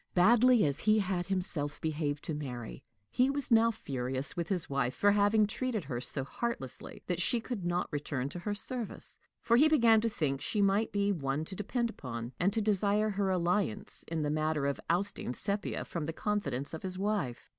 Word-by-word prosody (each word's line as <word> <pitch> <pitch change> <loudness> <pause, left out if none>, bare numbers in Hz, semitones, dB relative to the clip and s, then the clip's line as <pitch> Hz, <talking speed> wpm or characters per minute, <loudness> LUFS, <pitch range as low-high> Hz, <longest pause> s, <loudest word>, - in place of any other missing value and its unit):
Badly 235 +4 +6
as 140 +1 -1
he 215 +3 +3
had 185 -3 0
himself 175 -6 -2
behaved 150 -2 -2
to 160 - -3
Mary, 125 -6 -6 0.3
he 255 +2 +3
was 280 -2 -2
now 230 0 +6
furious 135 - -4
with 170 -1 -2
his 185 -4 +1
wife 135 -2 -1
for 205 - +4
having 205 +1 +4
treated 220 -1 -2
her 125 -4 -4
so 135 +1 -2
heartlessly 140 - -5
that 180 -1 -1
she 235 +6 +2
could 225 -4 -5
not 175 0 0
return 140 -2 -2
to 175 - -7
her 205 +3 -3
service; 235 +2 -5 0.2
for 235 0 +4
he 295 +5 +7
began 235 -8 +5
to 230 - +1
think 140 -9 -1
she 215 - -1
might 200 +2 +2
be 200 0 +1
one 145 -3 -1
to 190 - -6
depend 235 +4 -1
upon, 120 - -6
and 185 +3 +3
to 225 - 0
desire 210 +1 +2
her 195 -1 0
alliance 180 - 0
in 160 -2 -2
the 145 - 0
matter 155 -1 0
of 140 0 -1
ousting 175 -7 -1
Sepia 200 0 0
from 165 -3 -4
the 160 - -3
confidence 145 - -1
of 160 - -5
his 185 -1 -5
wife. 195 - -2
185 Hz, 200 wpm, -31 LUFS, 145-215 Hz, 0.3 s, he